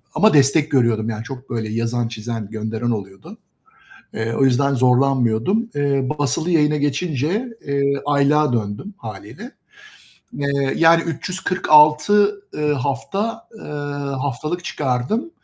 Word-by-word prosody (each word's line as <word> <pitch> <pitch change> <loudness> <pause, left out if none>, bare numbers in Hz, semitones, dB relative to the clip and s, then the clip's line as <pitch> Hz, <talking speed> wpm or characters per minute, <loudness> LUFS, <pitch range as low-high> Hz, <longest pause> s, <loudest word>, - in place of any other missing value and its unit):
ama 215 +1 +4
destek 145 +2 +4
görüyordum; 115 -4 +2
yani, 110 0 -4
çok 130 +1 -9
böyle 115 -2 -3
yazan, 115 +1 -1
çizen, 110 -2 -6
gönderen 110 +2 -3
oluyordu. 95 -3 -7 0.8
Eee, 115 0 -3
o 135 - +1
yüzden 140 +2 +2
zorlanmıyordum. 130 - +2
Eee, 140 -2 0
basılı 145 +5 0
yayına 150 -2 +3
geçince, 150 - -1 0.2
eee, 140 0 +1
aylığa 145 -1 +2
döndüm 110 - -3
hâliyle, 110 - -9 0.8
eee, 140 -1 -1
yani 165 0 +5
346, 180 +4 +3
ııı, 150 -1 0
hafta, 200 - -3
eee, - - -13 0.6
haftalık 150 +6 -3
çıkardım. 135 - -2
140 Hz, 115 wpm, -20 LUFS, 120-155 Hz, 0.8 s, yani